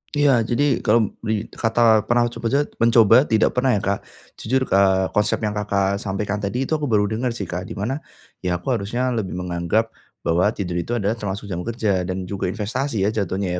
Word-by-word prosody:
Iya, 145 -1 +4 0.2
jadi, 120 +4 +1 0.2
kalau 110 -1 +3
di 110 -1 -2 0.2
kata 115 +1 0 0.3
pernah 120 0 +3
coba-coba 130 +5 0 0.2
mencoba 115 -3 +5
tidak 110 -1 +3
pernah, 125 +1 +1
ya, 100 - -1
Kak. 100 +1 0 0.4
Jujur 130 0 0
k - - -9
eee, 95 -1 +4
konsep 105 0 +2
yang 105 - 0
Kakak 100 -1 0
sampaikan 100 +1 -3
tadi 105 +6 -2
itu 135 - -7
aku 150 - -2
baru 105 -4 +3
dengar, 120 +2 -1
sih, 105 - -4
Kak, 90 +1 -4
di - - -7
mana, 115 +8 -2 0.4
ya, 90 -1 -1
aku 90 +10 -3
harusnya 120 +3 -1
lebih 110 -7 -3
menganggap 90 +5 -1 0.3
bahwa 85 +4 +2
tidur 90 -3 -3
itu 115 +8 -2
adalah 105 -1 0
termasuk 100 0 -5
jam 90 - -3
kerja, 105 -6 0
dan 95 0 -3
juga 95 +1 -3
investasi, 110 +3 -2
ya, 100 - +3
jatuhnya, 95 -3 -2
105 Hz, 200 wpm, -22 LUFS, 95-120 Hz, 0.4 s, mencoba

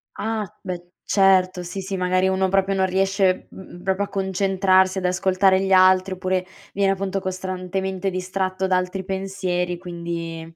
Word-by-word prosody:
Ah, 220 -1 -2 0.2
beh, 175 -2 -6 0.2
certo, 185 -2 +3
sì, 180 +3 -6
sì, 195 +1 -4
magari 185 0 +1
uno 190 0 +1
proprio 195 +1 +2
non 190 0 +2
riesce, 190 0 +1
mhmm, 180 -2 -12
proprio 190 +1 0
a - - -3
concentrarsi, 190 -1 +2
ad 185 - -2
ascoltare 190 +1 +3
gli 195 0 -1
altri 185 0 +5
oppure 185 0 -1 0.3
viene 195 -1 +2
appunto 195 0 -2
costantemente 185 0 -3
distratto 185 +1 -2
da 185 - +2
altri 185 +1 -3
pensieri, 190 -2 -2
quindi 170 -2 -5
190 Hz, 155 wpm, -22 LUFS, 185-195 Hz, 0.3 s, altri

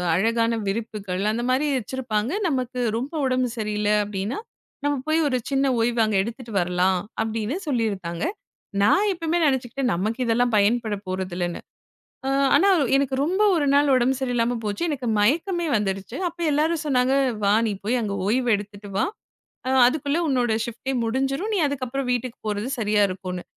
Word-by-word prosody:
அழகான 230 +4 +2
விரிப்புகள் 205 -3 -3
அந்த 235 +2 -2
மாரி 260 +4 +2
வச்சிருப்பாங்க. 245 -1 -2 0.2
நமக்கு 255 -4 -2 0.2
ரொம்ப 265 +7 -4
உடம்பு 255 -1 +1
சரியில்ல 210 -1 -1
அப்டின்னா, 205 +3 -3 0.5
நம்ம 290 0 +2
போய் 315 +1 +2
ஒரு 255 -3 +1
சின்ன 275 0 +1
ஓய்வு 235 +1 +1
அங்க 215 - -1
எடுத்துட்டு 230 +1 -7
வரலாம் 180 +1 +1 0.2
அப்டின்னு 225 +5 -2
சொல்லியிருக்காங்க. 200 - -2 0.6
நான் 400 - +4
எப்பவுமே 335 -1 -1
நெனைச்சுக்கிட்டேன். 260 -2 0
நமக்கு 215 +7 -2
இதெல்லாம் 240 +1 +2
பயன்பட 215 +1 +2
போறதில்லன்னு. 180 -2 -3 0.7
அ - - 0 0.3
ஆனா 400 - +5 0.3
எனக்கு 275 -1 +1
ரொம்ப 375 +6 +1
ஒரு 300 -4 +1
நாள் 285 0 +4
உடம்பு 255 +1 +3
சரியில்லாம 245 -2 0
போச்சு. 205 +7 -3
எனக்கு 265 -4 -3
மயக்கமே 335 - +1
வந்துருச்சு. 195 +2 -3
அப்போ 340 0 -8
எல்லாரும் 310 +2 +1
சொன்னாங்க, 260 -1 +2 0.3
வா 200 - +4
நீ 215 - 0
போய் 245 +4 +1
அங்க 205 -2 -2
ஓய்வு 245 +4 +1
எடுத்துட்டு 205 0 -9
வா. - - +3 0.8
அதுக்குள்ள 285 +3 0
உன்னோட 250 -4 +1
ஷிப்ட்டே 250 +3 -4
முடிஞ்சிரும். 270 - -1
நீ 410 - +1
அதுக்கப்புறம் 270 -1 -3
வீட்டுக்கு 245 0 -2
போறது 210 +3 -2
சரியா 210 -1 +2
இருக்குன்னு. 185 -1 -5
240 Hz, 150 wpm, -24 LUFS, 210-270 Hz, 0.8 s, ஆனா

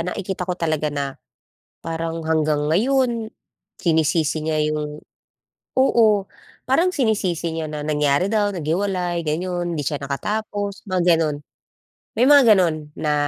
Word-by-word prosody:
nakikita 180 +1 -4
ko 180 - -1
talaga 155 -3 -1
na 140 -2 -3 0.7
parang 165 0 -4
hanggang 150 -2 +1
ngayon, 235 +3 +1 0.5
sinisisi 160 -2 +1
niya 155 -1 0
‘yung 150 0 -4 0.7
oo, 220 -6 +3 0.4
parang 335 +8 +3
sinisisi 205 - 0
niya 160 - -2
na 150 - -5
nangyari 150 +2 +2
daw, 210 -1 +1
naghiwalay, 175 +1 -1
gano’n. 175 +2 -2
Hindi 155 - -2
siya 145 - 0
nakatapos, 205 +7 -3
mga 180 -3 +3
gano’n. 155 -3 0 0.8
May 240 - +3
mga 285 -1 +8
ganun 155 -5 0
na 150 -1 -1
170 Hz, 125 wpm, -21 LUFS, 155-205 Hz, 0.8 s, mga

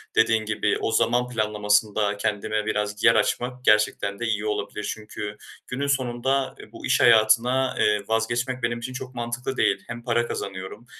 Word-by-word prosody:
dediğin 110 -1 +3
gibi 105 -1 0
o - - -1
zaman 120 +2 +2
planlamasında 105 -2 +1
kendime 105 +1 -1
biraz 105 0 -2
yer 115 - +6
açmak 125 +4 -1
gerçekten 105 -1 +2
de 120 - -2
iyi 110 -2 -1
olabilir. 105 0 -3
Çünkü 105 -1 -7 0.3
günün 140 +3 -3
sonunda 135 0 0
ı - - -14
bu - - -9
iş - - +2
hayatına, 120 +3 +4
eee, 105 -1 +2
vazgeçmek 120 +3 -1
benim 120 0 0
için 130 +2 -6
çok 130 0 -7
mantıklı 120 +2 -4
değil. - - +2
Hem 120 0 -7
para 120 -1 +1
kazanıyorum 95 +4 -6
115 Hz, 165 wpm, -24 LUFS, 105-120 Hz, 0.3 s, yer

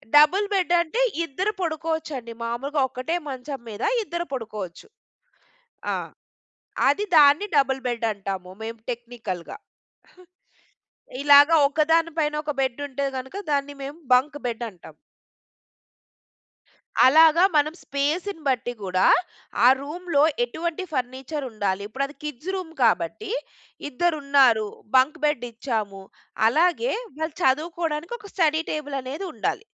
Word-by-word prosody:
Double 305 +8 +6
bed 365 -3 +1
అంటే 340 +9 -2 0.2
ఇద్దరు 370 +8 -2
పడుకోవచ్చండి. 315 -6 -3
మామూలుగా 270 +5 -2
ఒక్కటే 260 +6 -3
మంచం 270 +1 -6
మీద 215 +1 -6 0.2
ఇద్దరు 345 -2 -4
పడుకోవచ్చు. 210 -8 -6 1.0
ఆ! - - 0 0.9
అది 290 +10 +2
దాన్ని 295 +6 +6
డబుల్ 270 -2 +3
బెడ్ 235 -1 -2
అంటాము. 195 -3 -5
మేము 225 +1 -6
టెక్నికల్‌గా. 235 -7 -6 1.7
ఇలాగ 285 0 +8 0.2
ఒకదాని 320 +3 +2
పైన 300 -1 +1
ఒక 300 - -3
బెడ్ 260 0 -1
ఉంటే 280 +1 -2
గనుక, 265 +8 -8 0.2
దాన్ని 285 0 -1
మేము 285 +4 -7 0.2
బంక్ 280 +4 +2
బెడ్ 235 -1 -3
అంటాం. 180 -4 -15 2.1
అలాగ 315 +4 +7 0.2
మనం 300 +1 +3
స్పేస్‌ని 315 +6 -2
బట్టి 245 -2 0
గూడా, 185 -1 +1 0.6
ఆ - - +8
రూమ్‌లో 300 +1 -1 0.2
ఎటువంటి 335 +8 -4
ఫర్నిచర్ 265 +2 -3
ఉండాలి. 200 -3 -2
ఇప్పుడు 265 +5 -2
అది 290 - -14
కిడ్స్ 300 +3 -5
రూమ్ 360 -4 -6
కాబట్టి 225 - 0 0.6
ఇద్దరు 330 +4 0
ఉన్నారు 265 -6 +4 0.3
బంక్ 270 +5 +3
బెడ్ 295 -5 +1
ఇచ్చాము. 215 -5 -3 0.5
అలాగే 350 - +2 0.3
వాళ్ళు 315 -1 -3
చదువుకోవడానికి 320 - 0
ఒక 410 -2 -13
స్టడీ 320 -3 +2
టేబుల్ 290 -2 -3
అనేది 285 +9 -5
ఉండాలి. 270 - -2
285 Hz, 120 wpm, -24 LUFS, 245-320 Hz, 2.1 s, ఇలాగ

